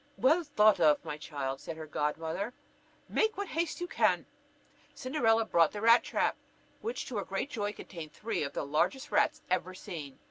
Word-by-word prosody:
"Well 315 +7 +4
thought 215 - +4
of, 155 -3 +4
my 150 - -3
child," 140 -3 -4
said 165 - -6
her 160 - -6
godmother; 160 +9 -2 0.5
"make 440 -2 +1
what 405 -2 -3
haste 330 0 -1
you 350 - -2
can." - - +2 0.7
Cinderella 230 -5 +2
brought 170 -6 +3
the 205 - -5
rat 230 +2 +7
trap, - - 0 0.4
which, 465 +3 -3
to 240 - -5
her 200 - -1
great 195 +10 -3
joy, 205 -4 -2
contained 165 -7 -9
three 220 +8 -3
of 140 - -3
the - - -2
largest 180 - 0
rats 310 0 +2
ever 185 0 0
seen. 150 -7 -7
205 Hz, 180 wpm, -31 LUFS, 155-260 Hz, 0.7 s, rat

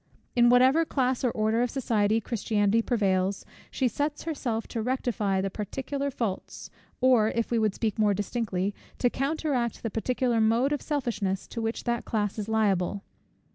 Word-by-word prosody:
In 240 0 +6
whatever 260 +6 +5
class 260 -5 0
or 250 - +3
order 220 +1 +1
of 245 - +1
society 225 -5 +1
Christianity 215 -1 +1
prevails, 195 -5 0 0.2
she 260 - 0
sets 290 +5 -2
herself 250 -8 -3
to 230 - -3
rectify 220 -5 0
the 195 0 -2
particular 270 +7 -3
faults, 225 -8 -4 0.3
or, 250 -4 +5
if 230 +1 -2
we 235 - +2
would 215 -2 +1
speak 220 -1 -2
more 210 -2 +3
distinctly, 205 -2 -2 0.2
to 245 - +2
counteract 275 -4 -1
the 225 - -2
particular 240 +1 0
mode 235 +6 +3
of 290 - -2
selfishness, 225 -10 -2
to 230 - -4
which 225 +1 -2
that 235 -1 -1
class 210 -1 -2
is 210 +1 -4
liable. 205 -3 +1
230 Hz, 165 wpm, -27 LUFS, 210-255 Hz, 0.3 s, In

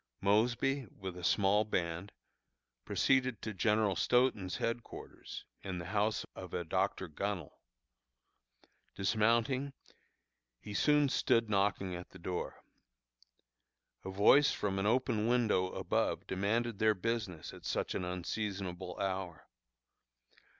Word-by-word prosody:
Mosby, 120 +6 +2
with 95 -2 -7
a 90 - -9
small 100 +3 +3
band, 90 -2 -2 0.7
proceeded 130 -4 +2
to 110 - -3
General 105 0 +2
Stoughton's 115 -3 +2
headquarters, 115 0 -5 0.2
in 95 -2 -4
the 85 - -5
house 105 +1 +1
of 95 -2 -7
a 90 - -1
Dr. 95 +2 -1
Gunnel. 90 0 -4 1.4
Dismounting, 115 +7 +1 0.9
he 105 - -8
soon 150 +5 +4
stood 115 -4 +2
knocking 100 -2 +1
at 90 +1 -8
the - - -13
door. 90 0 -4 1.4
A - - -5
voice 105 +9 +5
from 95 -2 -1
an 100 - +1
open 115 -2 +2
window 115 -6 +3
above - - -1
demanded 105 +4 -1
their 110 0 +4
business 100 -5 -3
at - - -12
such - - -1
an - - -2
unseasonable 90 0 -4
hour. 95 -4 -3
100 Hz, 115 wpm, -34 LUFS, 95-115 Hz, 1.4 s, voice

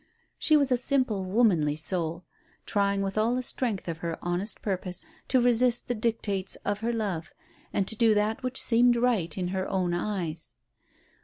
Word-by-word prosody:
She 310 -1 +4
was 280 -3 +1
a 250 - +4
simple, 250 -6 0
womanly 185 -8 +2
soul, 165 +1 -1 0.4
trying 200 -1 +1
with 195 +2 -2
all 230 +3 +2
the 255 - -2
strength 235 -7 -2
of 165 -1 -4
her 170 -1 -4
honest 175 +5 -2
purpose 185 -2 -2 0.2
to 260 - +3
resist 245 0 +4
the 245 - 0
dictates 215 -4 -1
of 205 0 -1
her 230 +2 -1
love, 195 -7 -3 0.4
and 195 - 0
to 220 - +2
do 225 -1 +4
that 210 +3 0
which 255 0 -3
seemed 240 +1 +4
right 225 -10 +1
in 180 -1 -2
her 190 0 -2
own 185 -2 0
eyes. 175 -4 -3
205 Hz, 175 wpm, -27 LUFS, 180-235 Hz, 0.4 s, She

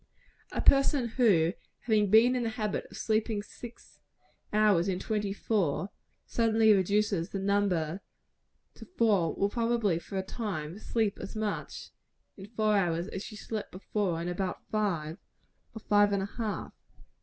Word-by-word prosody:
A - - -2
person 275 -2 +4
who, 195 -9 +3 0.3
having 215 -3 +2
been 230 +5 +6
in 250 - 0
the 230 - -1
habit 215 -3 -3
of - - -11
sleeping 215 -1 0
six 225 +4 -12 0.5
hours 210 -4 +3
in 190 -2 0
twenty 210 0 -2
four, 195 -3 -1 0.3
suddenly 225 -1 +3
reduces 200 -2 +1
the - - -4
number 195 -3 0 0.7
to - - -12
four, 205 -8 +3
will, 200 - +1
probably, 230 -7 +1
for 195 +3 -7
a 190 - -1
time, 190 -5 -5
sleep 220 -2 -1
as 195 - -7
much 215 -1 -4 0.4
in 195 0 -10
four 215 -1 +1
hours 175 -1 0
as 190 - -5
she 215 - -9
slept 215 +1 -5
before 185 -2 -2
in 170 - -4
about 180 +1 -3
five, 175 -7 -1 0.6
or - - -5
five 205 0 +3
and 195 -1 0
a 200 - -5
half. 215 -2 -3
205 Hz, 155 wpm, -29 LUFS, 190-220 Hz, 0.7 s, been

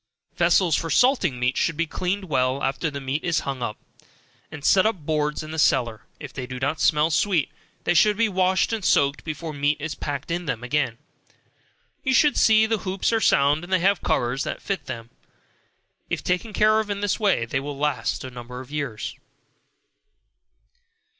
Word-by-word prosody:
Vessels 175 -1 +3
for 165 - -2
salting 185 - +3
meat 125 +1 +1
should 165 - 0
be 170 - +1
cleaned 185 +5 -2
well 130 -3 0
after 135 +4 -1
the 140 -1 -6
meat 135 +3 -3
is 165 -3 +1
hung 135 -2 -4
up, 110 -2 -3 0.7
and 150 -3 -8
set 190 - +5
on 205 -9 -1
boards 150 0 -1
in 155 - -8
the 160 - -4
cellar, 115 -6 +1
if 145 -3 -9
they 130 -2 -5
do 130 -1 -6
not 145 +4 -1
smell 150 +1 +3
sweet, 170 -1 +1 0.3
they 175 - +2
should 210 +3 +4
be 230 0 +3
washed 185 +1 +1
and 220 -3 -2
soaked 140 -5 +2
before 155 0 -5
meat 145 +1 0
is 155 +1 -4
packed 145 +1 -5
in 175 +1 -2
them 115 - -3
again. 125 -3 -1 1.1
You 265 -2 +2
should 295 -1 +4
see 220 0 +5
that 220 0 0
the - - -11
hoops 190 +4 -1
are 225 - +2
sound, 145 0 +3
and 175 - -10
have 185 +1 +3
covers 125 +3 0
made - - -3
to - - -19
fit 195 -1 -4
them. 115 -2 -7 1.0
If - - -2
taken 180 +5 -1
care 215 +1 +3
of 215 -1 -3
in 200 0 -3
this 205 +1 0
way, 195 - +2
they 125 +3 -2
will 140 +1 -6
last 150 0 -1
a 130 - -7
number 125 0 -8
of 130 +1 -11
years. 125 -5 -4
155 Hz, 195 wpm, -24 LUFS, 135-190 Hz, 1.1 s, set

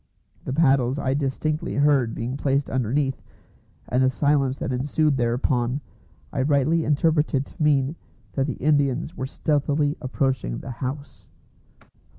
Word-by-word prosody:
The - - -3
paddles 135 -4 +3
I 130 -2 0
distinctly 145 +2 -2
heard 140 -5 +3
being 120 +3 -3
placed 140 0 0
underneath, 135 +2 0 0.7
and 125 - +1
the 130 - +4
silence 140 0 +1
that 130 - -3
ensued 145 +3 +1
thereupon 120 +1 0 0.5
I - - 0
rightly 145 +4 +2
interpreted 150 -2 +2
to - - -13
mean 145 -1 +2 0.4
that 135 0 0
the 140 - -2
Indians 145 +2 +1
were 130 - -3
stealthily 145 0 0
approaching 130 - -1
the 130 - -7
house. 135 +4 -6
140 Hz, 135 wpm, -24 LUFS, 130-150 Hz, 0.7 s, the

